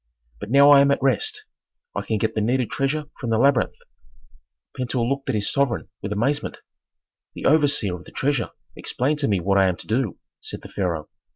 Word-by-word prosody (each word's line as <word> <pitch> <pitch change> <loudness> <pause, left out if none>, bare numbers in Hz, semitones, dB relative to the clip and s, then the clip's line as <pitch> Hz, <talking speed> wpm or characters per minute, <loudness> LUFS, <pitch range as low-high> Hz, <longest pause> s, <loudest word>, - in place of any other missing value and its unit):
But 105 - -7
now 140 +3 +7
I 140 -1 +8
am 140 - +4
at 140 - +2
rest; 425 - 0 0.5
I - - -1
can 110 - -1
get 110 +2 -1
the 110 - -1
needed 125 +2 0
treasure 145 +2 -1
from 120 - -4
the 115 - +2
labyrinth." 135 -1 +3 1.0
Pentuer 125 -1 -1
looked 135 +2 -2
at - - +1
his 105 0 0
sovereign 125 - 0
with 100 - -5
amazement. 135 +8 -1 0.8
"The - - -6
overseer 145 - +3
of 90 - -15
the - - -13
treasure 140 -3 0 0.3
explained 145 +4 -1
to 140 - +1
me 100 -3 +1
what 100 +3 +2
I 95 - +5
am 90 - 0
to - - -11
do," 115 -2 -1 0.2
said - - -7
the - - -10
pharaoh. 85 -6 -2
125 Hz, 200 wpm, -23 LUFS, 105-140 Hz, 1.0 s, I